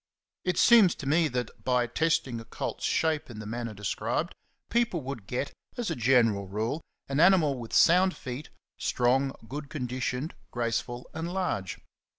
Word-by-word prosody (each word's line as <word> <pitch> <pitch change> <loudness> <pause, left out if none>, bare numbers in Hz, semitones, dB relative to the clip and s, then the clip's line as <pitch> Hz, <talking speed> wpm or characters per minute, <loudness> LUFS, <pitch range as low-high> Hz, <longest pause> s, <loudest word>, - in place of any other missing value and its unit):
It 180 -2 0
seems 220 -7 +7
to - - -8
me 160 +4 +3
that, 125 -3 -4
by 125 -1 +2
testing 130 -2 0
a - - -8
colt's 115 - -5
shape 160 -4 +1
in 115 - -9
the 110 - -7
manner 115 0 -4
described, 100 0 -2 0.4
people 230 -8 +1
would 130 -7 -6
get, 130 +4 -3 0.2
as 240 -3 -2
a - - -1
general 115 -5 +3
rule, 110 - -2 0.3
an 140 +1 -1
animal 160 -7 +5
with 115 -2 -8
sound 185 +2 +5
feet, 130 +4 -7 0.3
strong, 130 +3 +2 0.2
good 145 +3 -6
conditioned, 125 +1 -3 0.2
grace 115 -1 0
ful, 120 +1 -8
and 165 +2 -4
large. 180 - -2
130 Hz, 165 wpm, -28 LUFS, 120-160 Hz, 0.4 s, seems